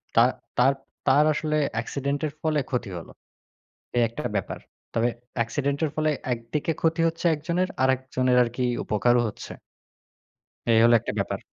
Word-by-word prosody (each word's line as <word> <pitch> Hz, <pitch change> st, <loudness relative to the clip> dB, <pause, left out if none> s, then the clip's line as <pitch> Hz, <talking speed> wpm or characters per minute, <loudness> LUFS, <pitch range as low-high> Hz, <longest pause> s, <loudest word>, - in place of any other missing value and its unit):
তা -, -, +7 dB, 0.3 s
তার 130 Hz, +3 st, +5 dB, 0.3 s
তার 140 Hz, +3 st, +6 dB
আসলে 155 Hz, +1 st, -1 dB, 0.2 s
অ্যাক্সিডেন্টের 140 Hz, +5 st, -2 dB
ফলে 155 Hz, -2 st, +1 dB
ক্ষতি 120 Hz, -5 st, -2 dB
হলো। 85 Hz, -, -9 dB, 0.9 s
এই 120 Hz, -, +4 dB
একটা 125 Hz, +5 st, -7 dB
ব্যাপার। 95 Hz, -, -3 dB, 0.4 s
তবে 115 Hz, +1 st, +2 dB, 0.3 s
অ্যাক্সিডেন্টের 140 Hz, +6 st, 0 dB
ফলে 155 Hz, 0 st, +2 dB, 0.2 s
একদিকে 120 Hz, +8 st, -3 dB
ক্ষতি 165 Hz, 0 st, +1 dB
হচ্ছে 165 Hz, +1 st, -3 dB
একজনের, 170 Hz, +5 st, -1 dB
আরেকজনের 130 Hz, -1 st, +2 dB
আরকি 120 Hz, +2 st, -2 dB, 0.2 s
উপকারও 120 Hz, +3 st, +3 dB
হচ্ছে। -, -, -8 dB, 1.2 s
এই 115 Hz, -, +5 dB
হলো 120 Hz, 0 st, +6 dB
একটা -, -, -4 dB
ব্যাপার। -, -, -2 dB
130 Hz, 135 wpm, -25 LUFS, 120-155 Hz, 1.2 s, তা